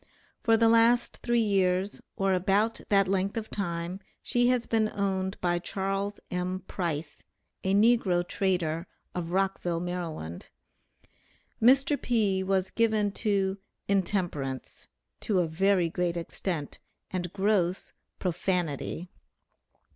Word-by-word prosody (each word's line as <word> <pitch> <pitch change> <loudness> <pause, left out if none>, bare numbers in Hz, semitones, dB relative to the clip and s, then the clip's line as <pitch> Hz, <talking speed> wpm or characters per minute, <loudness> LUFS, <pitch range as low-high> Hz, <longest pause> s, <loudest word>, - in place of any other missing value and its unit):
For 225 -1 +4
the 230 0 +4
last 230 +1 +4
three 240 -1 +1
years, 190 -1 +1
or 195 0 +1
about 200 +5 +1
that 195 -2 +4
length 195 +2 0
of 220 -1 -4
time, 175 -1 -3 0.2
she 245 0 +2
has 250 -1 +2
been 220 -1 +1
owned 190 -1 -1
by 175 -1 +1
Charles 195 +2 -2
M. 180 +1 -2
Price, 160 -6 -4 0.4
a 190 +1 +2
negro 200 -5 +3
trader, 175 -4 0 0.3
of 175 -2 -3
Rockville, 185 -2 0
Maryland. 170 - -5 1.1
Mr. 275 +4 +4
P. 210 -6 +1
was 190 0 0
given 215 -3 +2
to 195 -2 0 0.3
'intemperance,' 175 -9 -2 0.3
to 205 - 0
a 180 - +3
very 185 +2 +2
great 175 0 -1
extent, 165 -2 -4 0.3
and 180 -2 -3
gross 190 -2 0 0.2
'profanity.' 180 -2 -2
190 Hz, 115 wpm, -28 LUFS, 175-205 Hz, 1.1 s, For